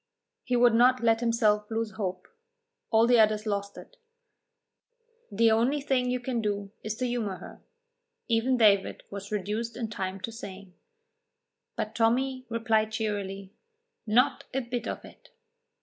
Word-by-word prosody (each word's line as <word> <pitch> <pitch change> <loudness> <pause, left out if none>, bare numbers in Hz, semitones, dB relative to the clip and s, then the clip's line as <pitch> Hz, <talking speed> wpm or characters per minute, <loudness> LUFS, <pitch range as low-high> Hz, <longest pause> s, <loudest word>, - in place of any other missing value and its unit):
He 250 - -1
would 240 -1 +5
not 250 +1 +4
let 225 -1 +4
himself 220 -3 +2
lose 225 -1 -2
hope. 190 -4 -4 0.6
All 225 0 +5
the 240 0 +5
others 215 0 +3
lost 200 -1 -3
it. - - -13 1.3
"The 225 +2 +4
only 240 +7 +2
thing 260 -3 0
you 250 0 0
can 245 -1 -2
do 205 -2 -2
is 215 0 -4
to 255 +2 -2
humour 235 -6 -2
her," - - -12 0.7
even 235 +2 +2
David 205 -4 +3
was 200 0 -7
reduced 215 +3 -3
in 225 -3 -4
time 190 -2 -4
to 230 - -4
saying; 195 -4 -9 1.0
but 215 - -3
Tommy 255 +3 +1
replied 225 -2 +1
cheerily, 200 -3 -4 0.5
"Not 245 +6 +2
a 270 - +1
bit 240 0 -4
of - - -5
it." - - -16
225 Hz, 150 wpm, -28 LUFS, 210-245 Hz, 1.3 s, would